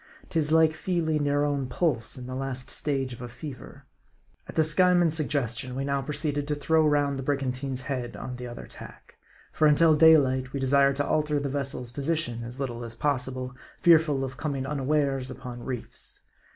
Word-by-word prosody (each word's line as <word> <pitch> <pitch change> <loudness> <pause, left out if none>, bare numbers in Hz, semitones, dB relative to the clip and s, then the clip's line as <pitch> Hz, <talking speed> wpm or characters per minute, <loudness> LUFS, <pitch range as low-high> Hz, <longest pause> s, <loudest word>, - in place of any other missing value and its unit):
'Tis 155 -2 +1
like 160 -1 +5
feeling 160 -4 0
your 145 +1 +2
own 140 -3 -1
pulse 125 -4 -1
in 125 - -7
the 130 - -6
last 130 -1 -3
stage 135 -3 -1
of 120 - -10
a 120 - -6
fever. 125 +1 -10 0.6
At - - -9
the 160 - +4
Skyeman's 175 +1 +4
suggestion, 130 -5 -2
we 135 +1 -2
now 140 0 0
proceeded 145 0 -2
to 150 - 0
throw 155 +2 +3
round 145 -2 +1
the - - -4
brigantine's 135 -1 -2
head 130 -3 -4
on 125 -1 -6
the 125 0 -6
other 120 - -8
tack. - - -12 0.3
For 155 - +3
until 155 +1 +5
daylight 135 -5 +5
we 140 - -2
desired 140 +1 +4
to 145 +1 -1
alter 150 -1 +1
the 140 -1 -2
vessel's 135 -3 -4
position 140 -4 -2
as 120 +3 -8
little 120 -3 -3
as 115 -1 -6
possible, 130 -2 -1 0.3
fearful 160 -5 +4
of 130 -1 -5
coming 140 -4 -2
unawares 140 -2 0
upon 125 -2 -8
reefs. 125 -3 -4
140 Hz, 180 wpm, -27 LUFS, 130-150 Hz, 0.6 s, like